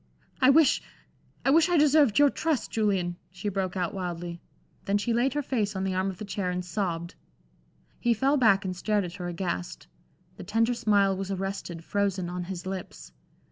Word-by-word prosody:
"I 260 - +6
wish 295 0 +5 0.6
I 270 - +4
wish 325 +3 +5
I 350 - +3
deserved 295 -6 +4
your 290 -1 +6
trust, 315 -5 -1
Julian," 190 -5 0
she 180 +3 -4
broke 190 -1 -2
out, 175 -2 -1
wildly. 175 -2 -5 0.4
Then 200 +1 +2
she 230 +3 -1
laid 245 +3 +1
her 295 - 0
face 215 -7 -1
on 190 - -2
the 190 -1 -1
arm 185 +1 0
of 190 - -7
the 215 - -6
chair 195 -2 -2
and 180 0 -3
sobbed. 170 -2 -3 0.9
He 240 -1 +2
fell 270 +6 +2
back 210 -6 +4
and 185 -1 -3
stared 205 +3 0
at 175 +1 -7
her 180 -2 -5
aghast. 170 - -4 0.5
The - - -8
tender 225 +3 +1
smile 200 -4 +2
was 195 0 -4
arrested, 195 -3 -4
frozen 195 -2 -1
on 180 0 -4
his 180 -1 -6
lips. 190 -1 -7
195 Hz, 190 wpm, -27 LUFS, 180-230 Hz, 0.9 s, I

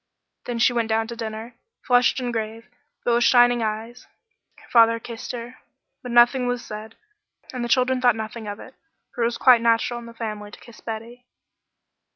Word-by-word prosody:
Then 240 -1 -3
she 245 +1 +3
went 230 -2 -1
down 225 0 +1
to 235 - -6
dinner, 225 +1 -7 0.3
flushed 245 +2 +3
and 245 -2 -3
grave, 225 +1 -4 0.4
but 240 - +2
with 240 0 +3
shining 245 -1 +5
eyes. 225 +3 -4 0.5
Her - - -19
father 230 -1 +5
kissed 230 0 -7
her, 245 +1 -8 0.4
but 250 - -7
nothing 245 +1 +5
was 245 -1 -2
said, 215 +1 -8 0.6
and 250 -2 -3
the 240 - -3
children 255 +1 +2
thought 245 -3 +4
nothing 220 0 -6
of 205 0 -6
it, 260 - -12 0.4
for 245 - -5
it - - +3
was 235 - -3
quite 245 -3 +6
natural 230 +1 +1
in 235 - -11
the 230 - -12
family 215 -2 -5
to - - -13
kiss 235 - -16
Betty. 235 +2 -8
235 Hz, 195 wpm, -23 LUFS, 225-245 Hz, 0.6 s, quite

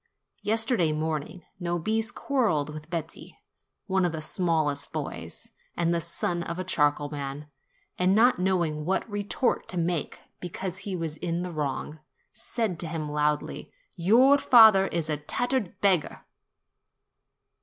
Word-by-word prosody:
Yesterday 220 - +2
morning 155 +2 -3 0.2
Nobis 205 +6 -1
quarrelled 220 - 0
with 155 +1 -9
Betti, 165 -2 -6 0.5
one 190 -1 +1
of 175 - +1
the 160 - -3
smallest 155 -4 0
boys, - - -6 0.3
and 170 0 +1
the 170 - 0
son 170 +1 -2
of 170 0 -4
a 185 - -2
charcoal 145 -4 +1
man, 140 0 -5 0.5
and 185 +2 +3
not 235 -1 +4
knowing 170 -5 0
what 190 +7 -1
retort 205 +2 -1
to 180 - -5
make, 170 -2 -1 0.2
because 180 +1 -5
he 190 - -2
was 165 -3 -4
in 170 +1 -2
the 180 - -5
wrong, 150 0 -3 0.3
said 225 -5 -3
to 170 - -1
him 155 -2 -4
loudly, 150 0 -1 0.2
"Your 240 +10 +5
father 220 -7 +7
is 165 -3 -2
a 155 -1 -1
tattered 220 - -2
beggar 185 -6 +1
170 Hz, 140 wpm, -27 LUFS, 155-195 Hz, 0.5 s, father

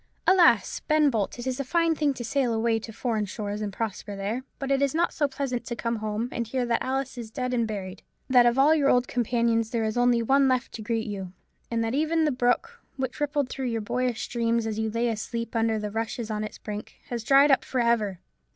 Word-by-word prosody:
Alas! 375 -2 +4
Ben 305 -2 +4
Bolt, 215 -2 -1
it 240 - -6
is 260 0 -2
a - - 0
fine 335 +4 +2
thing 300 -2 +1
to 240 - -5
sail 240 0 0
away 225 0 +1
to 225 - -8
foreign 220 -1 -1
shores 205 0 -4
and 210 -1 -3
prosper 205 -1 -4
there; 205 +6 -3
but 275 0 -3
it 275 0 +2
is 280 +1 +1
not 340 +1 +1
so 290 - +1
pleasant 270 -3 -3
to 235 - -4
come 230 0 -2
home 215 +2 -2
and 235 -2 -3
hear 250 +2 -1
that 235 -1 0
Alice 265 -1 -2
is 230 -2 -7
dead 250 +2 -3
and 235 -2 +1
buried; 190 -4 -6 0.3
that 250 -2 +6
of 240 +1 +2
all 285 +4 +6
your 290 -3 +3
old 250 0 +3
companions 230 -2 +1
there 230 -1 -1
is 220 +1 -1
only 245 -1 +3
one 270 +3 +4
left 255 -2 0
to 225 - -7
greet 225 +1 -1
you; 195 -3 -5 0.4
and 230 -1 0
that 225 +1 -1
even 315 +3 +2
the 300 - +2
brook, 255 - 0 0.2
which 260 0 -3
rippled 290 -2 0
through 260 +1 -4
your 230 -2 -1
boyish 245 +2 -1
dreams, 235 -1 0
as 220 -1 -3
you 220 0 0
lay 230 +2 0
asleep 230 +1 -3
amongst 225 -2 +1
the 210 - -3
rushes 225 +1 -3
on 215 0 -2
its 215 - -6
brink, 210 0 -7 0.2
has 235 -2 -3
dried 275 +4 +6
up 265 - +4
for 255 - -2
ever! 220 -6 +1
235 Hz, 240 wpm, -26 LUFS, 220-265 Hz, 0.4 s, that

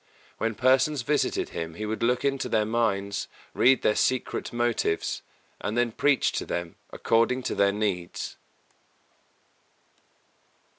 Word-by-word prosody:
When 115 -1 -1
persons 130 +3 +3
visited 150 +3 0
him 80 -1 -5
he 105 - -4
would 110 +1 -3
look 125 +3 +1
into 135 -2 0
their 110 -2 +2
minds, 100 -3 -1 0.3
read 130 +1 +4
their 105 - +3
secret 130 -1 0
motives, 120 -8 0 0.4
and 105 +3 -3
then 120 -1 +2
preach 140 +2 +2
to - - -3
them 85 -1 -3 0.2
according 115 +3 +1
to - - -2
their 100 0 +3
needs. 100 -4 -3
115 Hz, 130 wpm, -26 LUFS, 100-125 Hz, 0.4 s, read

